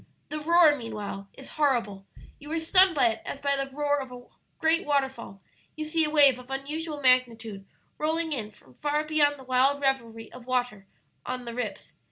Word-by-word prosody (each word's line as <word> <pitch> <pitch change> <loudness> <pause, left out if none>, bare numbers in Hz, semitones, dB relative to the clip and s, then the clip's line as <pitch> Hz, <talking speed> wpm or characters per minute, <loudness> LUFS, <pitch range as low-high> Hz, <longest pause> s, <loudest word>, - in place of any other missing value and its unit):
The 305 - -3
roar, 325 -1 +5
meanwhile, 210 -5 -6
is 270 - -12
horrible. 230 -9 0 0.3
You 295 +1 -10
are - - 0
stunned 365 +2 +4
by 245 -5 +4
it 220 - -4
as 275 - -6
by 280 0 +1
the 275 0 -3
roar 290 +1 0
of 265 -2 -7
a 245 0 -10 0.3
great 325 +3 +2
waterfall. 265 -9 -2 0.3
You 310 - -4
see 320 +1 +1
a - - -2
wave 285 -4 +5
of 250 0 -14
unusual 295 +3 -4
magnitude 230 -6 +1 0.3
rolling 320 +1 -1
in 220 -6 -4
from 165 -11 -21
far 295 - -1
beyond 300 -2 +2
the 265 - -12
wild 260 +2 +2
revelry 235 -5 -2
of 250 -1 -12
waters 245 -6 -1 0.4
on 250 -1 -5
'The 235 - -6
Rips.' 225 -5 -5
270 Hz, 190 wpm, -27 LUFS, 235-300 Hz, 0.4 s, roar